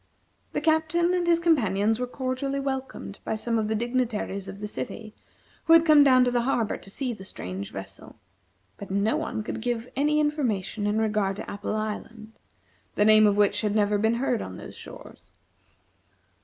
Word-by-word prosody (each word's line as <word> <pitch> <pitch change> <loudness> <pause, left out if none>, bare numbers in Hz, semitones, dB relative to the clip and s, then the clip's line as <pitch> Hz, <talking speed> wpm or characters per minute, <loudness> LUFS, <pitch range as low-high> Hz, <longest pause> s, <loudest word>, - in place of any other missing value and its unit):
The - - -1
Captain 325 +3 +2
and 355 -1 0
his 335 -1 +4
companions 225 - +2
were 250 - -2
cordially 260 +2 -3
welcomed 265 -6 -5
by - - -2
some 230 +1 -1
of 215 - -1
the 220 - -1
dignitaries 230 -4 -2
of 195 - -8
the 210 - -5
city 215 - -6 0.5
who 325 - +6
had 330 0 +7
come 305 -3 +7
down 255 -2 +6
to 250 - +1
the 245 -1 +1
harbor 235 -3 0
to - - -11
see 250 +4 -3
the 190 - -10
strange 95 - -7
vessel; - - -10 0.6
but 200 - -9
no 200 +3 +1
one 215 - -3
could 215 - -5
give 240 0 -3
any 300 +3 +2
information 235 - -1
in 210 +1 0
regard 210 -3 0
to - - -7
Apple 205 +1 -4
Island, 215 +1 -5 0.6
the 210 - +3
name 215 0 +7
of 205 0 +2
which 205 0 +3
had 210 -1 -1
never 205 -1 +2
been 220 +2 +2
heard 245 -1 0
on - - -7
those - - -10
shores. - - -12
225 Hz, 185 wpm, -26 LUFS, 210-270 Hz, 0.6 s, had